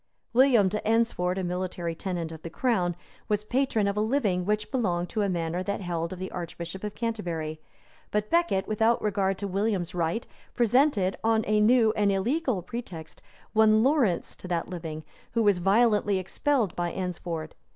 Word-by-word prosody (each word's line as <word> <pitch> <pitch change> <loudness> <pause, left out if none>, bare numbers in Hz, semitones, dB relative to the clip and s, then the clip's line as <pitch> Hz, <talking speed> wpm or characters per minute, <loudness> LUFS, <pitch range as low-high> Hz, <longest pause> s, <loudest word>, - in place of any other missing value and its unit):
William 245 -5 +5
de 210 +3 -1
Eynsford, 220 -5 +1
a 190 - -1
military 180 -1 -3
tenant 170 -1 -4
of 160 -1 -9
the 165 - -6
crown, 180 -4 0 0.3
was 210 0 +1
patron 240 -2 +1
of 200 - 0
a 210 - +1
living 215 -7 +1
which 210 0 0
belonged 180 -9 0
to 220 - -1
a 200 - +1
manor 170 0 -1
that 200 +2 -2
held 170 -3 -3
of 185 - -6
the 185 +1 -5
archbishop 175 +2 -6
of 210 -1 -4
Canterbury; 170 -9 -3 0.5
but 210 0 -1
Becket, 335 - +2
without 220 +2 +2
regard 195 -2 0
to 200 - -3
William's 195 -2 -1
right, 175 +6 -1 0.3
presented, 240 -5 +3
on 225 0 +3
a 215 0 +2
new 220 0 +5
and 205 -1 +2
illegal 235 - 0
pretext, 180 -7 -7 0.3
one 220 0 +5
Laurence 255 - +2
to - - -9
that 170 -2 -1
living, 160 -3 -6 0.3
who 230 -1 +2
was 205 -4 +3
violently 205 +1 +3
expelled 220 - 0
by 175 -1 -1
Eynsford. 170 -3 -4
200 Hz, 170 wpm, -27 LUFS, 175-225 Hz, 0.5 s, William